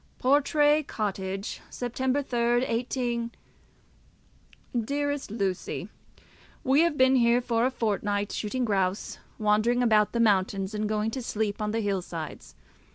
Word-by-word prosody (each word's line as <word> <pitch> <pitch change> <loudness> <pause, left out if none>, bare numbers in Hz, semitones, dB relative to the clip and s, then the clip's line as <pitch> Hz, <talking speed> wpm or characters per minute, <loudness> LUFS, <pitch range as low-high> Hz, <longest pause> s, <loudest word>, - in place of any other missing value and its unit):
Portray 295 +3 +3
Cottage, 195 -6 -4
3 245 - -4
Sept., 245 -2 +1
18. 235 0 -1 1.5
DEAREST 285 +2 -2
LUCY, 195 -4 -3 0.7
We 270 +4 +4
have 335 -3 +2
been 260 0 +5
here 235 0 +4
for 235 0 +1
a - - +1
fortnight, 205 -4 -1
shooting 245 +4 -2
grouse, 195 -2 -1 0.2
wandering 215 +3 +2
about 215 -3 +3
the 235 - 0
mountains, 195 -2 +2
and 210 0 -2
going 215 +1 0
to 260 - -4
sleep 215 -3 -2
on 210 - -1
the 225 +2 -1
hill 200 -3 0
sides. 165 -3 -8
230 Hz, 130 wpm, -27 LUFS, 205-255 Hz, 1.5 s, been